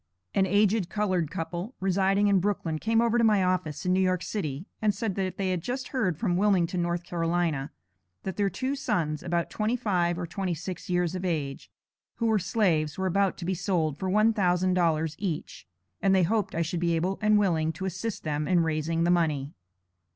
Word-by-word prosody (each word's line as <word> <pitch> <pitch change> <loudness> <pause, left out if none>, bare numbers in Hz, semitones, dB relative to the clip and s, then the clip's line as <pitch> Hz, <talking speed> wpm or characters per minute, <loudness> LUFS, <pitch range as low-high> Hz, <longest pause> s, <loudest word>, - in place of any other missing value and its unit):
An 190 -1 +3
aged 205 -1 +2
colored 185 -7 0
couple, 175 +8 -5
residing 195 +2 +2
in 200 -2 +4
Brooklyn, 180 -5 -1
came 225 +4 +2
over 235 0 +2
to - - +3
my 210 -4 +4
office, 180 -5 -1
in 180 - +2
New 185 - +3
York 185 -1 +1
City, 155 -6 -3 0.2
and 210 -2 +2
said 210 0 -2
that 190 -1 -3
they 190 -2 0
had 180 -2 -1
just 255 +7 -4
heard 195 - 0
from 175 -3 0
Wilmington, 180 -3 +2
N.C., 175 0 -3 1.0
that 190 - -4
their 200 -1 +1
two 265 +6 -2
sons 170 - -1
(about 170 -1 -1
twenty 215 +3 0
five 175 -7 0
or 180 - -3
twenty 180 +1 -3
six 180 +4 -7
years 175 -1 +1
of 185 0 -4
age), 150 -6 -3 0.5
who 230 - -2
were 220 -2 +3
slaves, 175 -6 +1
were 190 - -1
about 195 +1 +1
to 170 - -6
be 190 - 0
sold, 170 -5 -1
for 190 - -2
one 215 +3 +4
thousand 185 -2 +2
dollars 160 -3 +1
each; 180 - -4 0.3
and 195 -1 +4
they 185 - +4
hoped 200 +1 0
I 170 - +1
should 165 +1 -3
be 170 -1 +1
able 180 +4 -1
and 215 0 +4
willing 165 -6 +2
to 190 +5 -5
assist 190 +4 -4
them 150 -1 -2
in 180 -2 +3
raising 165 +1 0
the 175 - +3
money. 155 -5 +1
185 Hz, 200 wpm, -27 LUFS, 170-200 Hz, 1.0 s, in